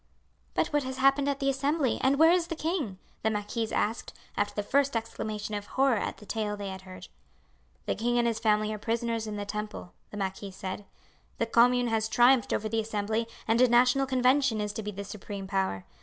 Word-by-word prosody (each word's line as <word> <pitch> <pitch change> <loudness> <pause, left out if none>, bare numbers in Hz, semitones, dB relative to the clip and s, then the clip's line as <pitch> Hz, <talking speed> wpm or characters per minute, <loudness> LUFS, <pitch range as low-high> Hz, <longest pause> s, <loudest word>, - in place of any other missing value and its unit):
"But - - +1
what 295 -1 +1
has 260 -1 -5
happened 275 +1 +3
at 280 -1 -1
the 275 - -1
Assembly 275 0 0
and 270 +1 +3
where 320 +2 +7
is 350 -1 +2
the 330 - -4
king?" 310 - -2 0.2
the 220 - +2
marquise 215 +1 -2
asked, 220 +3 -1 0.2
after 205 0 -1
the 205 - -1
first 275 +3 +1
exclamation 215 -2 -4
of 205 0 -4
horror 265 -3 +2
at - - -3
the 210 - -13
tale 210 -1 -2
they 200 -1 -5
had 190 0 -7
heard. 185 -1 -11 0.8
"The - - 0
king 240 +2 0
and 240 - +3
his 230 -2 0
family 215 -1 +2
are 215 - -5
prisoners 230 0 -1
in 210 - -4
the 205 0 -4
Temple," 210 -3 -6 0.2
the 210 - -8
marquis 195 0 -3
said. 190 +1 -6 0.5
"The 230 - +1
Commune 245 +1 +4
has 220 -1 0
triumphed 245 0 +4
over 215 - 0
the 225 +1 0
Assembly 220 +1 -1 0.2
and 225 +2 +3
a 255 - +7
National 250 +3 +4
Convention 260 -2 +3
is 210 0 -2
to 220 - -4
be 210 - -5
the 200 0 -6
supreme 200 0 -7
power. 190 - -1
225 Hz, 215 wpm, -29 LUFS, 210-255 Hz, 0.8 s, where